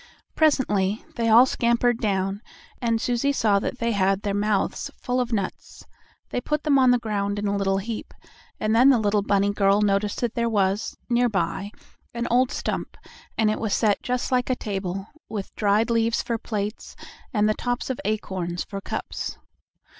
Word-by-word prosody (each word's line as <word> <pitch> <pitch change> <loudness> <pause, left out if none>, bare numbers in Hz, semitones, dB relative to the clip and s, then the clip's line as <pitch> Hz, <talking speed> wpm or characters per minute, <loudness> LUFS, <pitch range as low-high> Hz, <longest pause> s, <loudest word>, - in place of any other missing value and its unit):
Presently 215 -10 +2
they 230 -1 0
all 235 +3 +8
scampered 235 -1 +1
down, 195 -2 -1 0.4
and 230 -2 +1
Susie 245 +4 +1
saw 215 -7 +2
that 230 - -3
they 235 -1 0
had 195 -1 +1
their 200 - -1
mouths 205 0 0
full 250 0 -1
of 245 0 -3
nuts. 200 -4 -4 0.5
They 245 - -1
put 300 +3 -2
them 285 -3 +4
on 255 -1 +5
the 245 - +5
ground 205 -3 -2
in 205 - -2
a 200 0 0
little 195 -1 +1
heap, 215 +3 -5 0.5
and 215 +1 +1
then 250 +4 +7
the 265 - +6
little 210 -1 +2
bunny 200 0 +2
girl 200 0 +3
noticed 205 0 +1
that 240 -2 -1
there 235 0 0
was, 200 -1 0
nearby, 235 -4 0 0.5
an 235 0 -2
old 250 +1 +4
stump, - - -3 0.4
and 220 -2 +3
it - - -2
was 220 -3 0
set 210 -3 +2
just 250 +1 -2
like 250 0 +1
a 255 - +2
table, 195 -3 -4 0.2
with 205 -3 -5
dried 215 +3 +2
leaves 230 0 +1
for 230 -1 -2
plates, 210 0 -4 0.4
and 210 -2 +2
the 215 - +3
tops 245 +3 -2
of 255 - -5
acorns 190 -4 -2
for 195 -1 -7
cups. - - -5
215 Hz, 180 wpm, -24 LUFS, 200-240 Hz, 0.5 s, all